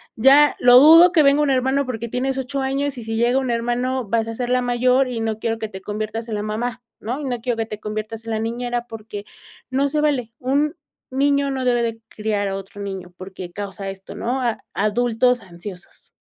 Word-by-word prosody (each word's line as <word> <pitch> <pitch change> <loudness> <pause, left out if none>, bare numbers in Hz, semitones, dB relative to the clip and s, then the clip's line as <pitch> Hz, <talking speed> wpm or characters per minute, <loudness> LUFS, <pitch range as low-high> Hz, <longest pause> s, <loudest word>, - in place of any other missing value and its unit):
ya 275 +5 +6
lo 245 0 +7
dudo 330 +5 +8
que 315 -4 +5
venga 280 +1 +4
un 295 - +2
hermano 265 +1 +1
porque 235 -1 -4
tienes 265 +2 -1
8 270 +1 -2
años 275 0 -1
y - - -7
si 225 0 -4
llega 240 +3 +3
un 260 -2 -2
hermano, 240 +2 -1
vas 225 +1 0
a 225 - -5
ser 245 0 -3
la 250 0 +3
mayor 250 +2 +2
y 235 -2 -3
no 220 -1 -2
quiero 225 0 -1
que 220 -1 -4
te 190 -1 -9
conviertas 215 +3 -4
en 215 - -2
la 205 - -2
mamá, 230 +3 -3 0.2
¿no? 245 +6 -4
Y 295 - -5
no 245 -3 -3
quiero 240 -1 -1
que 225 - -1
te 210 -1 -7
conviertas 215 +1 -5
en 225 - -4
la 220 - -1
niñera 240 +1 -2
porque 215 -2 -8 0.5
no 275 +2 +1
se 300 +1 0
vale. 255 -7 0
Un 285 +5 0 0.4
niño 280 +1 +2
no 260 -1 -2
debe 240 -1 +2
de 225 -1 -3
criar 210 -2 -2
a 195 - -2
otro 195 +1 -10
niño 190 -3 -6
porque 185 -1 -8
causa 195 +1 -5
esto", 195 0 -9
¿no? 250 +3 -2
a 235 -3 -1 0.2
adultos 240 +3 +2
ansiosos. 180 -1 -12
240 Hz, 220 wpm, -21 LUFS, 215-260 Hz, 0.5 s, dudo